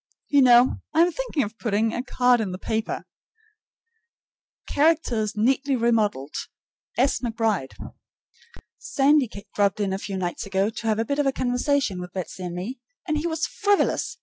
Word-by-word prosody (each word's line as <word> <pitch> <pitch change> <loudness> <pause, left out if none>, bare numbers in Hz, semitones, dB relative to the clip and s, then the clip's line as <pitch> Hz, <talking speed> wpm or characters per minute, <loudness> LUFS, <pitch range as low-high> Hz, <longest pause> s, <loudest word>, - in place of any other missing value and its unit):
You 285 -2 +5
know, 245 0 +6 0.2
I 320 - +6
am 350 +1 +4
thinking - - -2
of 215 +2 -7
putting 220 0 0
a 240 - -2
card 250 -2 +2
in 200 -4 -3
the - - -4
paper: 220 +3 -3 1.6
Characters 280 -9 +1
neatly 270 +5 +2
remodeled. 215 - 0 0.6
S. 265 +3 +2
McBride. 225 - -1 1.1
Sandy 280 -2 +2 0.2
dropped 200 0 +1
in 195 -2 0
two 195 0 -5
nights 180 +1 -3
ago 195 +2 0
to 225 0 -6
have 215 -1 +2
a 225 - 0
bit 280 +4 -2
of 275 -2 +2
conversation 245 -5 0
with 180 0 -9
Betsy 185 0 -6
and 175 -1 -5
me, 220 +9 -5 0.3
and 305 -2 0
he 330 - -2
was 325 0 -1
FRIVOLOUS. 405 -8 0
235 Hz, 155 wpm, -24 LUFS, 205-275 Hz, 1.6 s, know